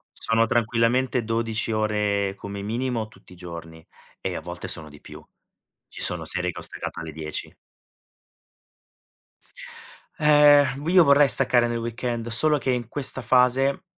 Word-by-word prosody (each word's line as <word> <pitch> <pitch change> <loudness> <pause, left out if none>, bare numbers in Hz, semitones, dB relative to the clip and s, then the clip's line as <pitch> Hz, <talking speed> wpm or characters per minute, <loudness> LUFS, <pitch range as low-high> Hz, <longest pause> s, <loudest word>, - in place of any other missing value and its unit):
Sono 115 0 +1
tranquillamente 120 +1 0
12 115 0 -2
ore 105 -2 -1
come 100 0 -8
minimo 115 +1 -3
tutti 110 - -19
i 90 - -14
giorni 85 -2 -10 0.4
e - - -4
a - - -5
volte 85 +1 -8
sono 80 -2 -4
di 75 - -16
più. - - -13 0.6
Ci - - -11
sono 90 -2 0
sere 90 +2 +1
che - - -10
ho - - -8
staccato - - -6
alle 80 -1 -7
10. 75 0 -5 2.6
Eh, 150 -1 +6 0.3
io 180 -1 +6
vorrei 140 0 +5
staccare 120 -2 +3
nel 120 0 -3
weekend, 120 0 -4
solo 150 +6 +2
che 130 - -2
in 120 -3 -2
questa 135 0 +2
fase, 130 +5 +2
115 Hz, 145 wpm, -23 LUFS, 100-130 Hz, 2.6 s, Eh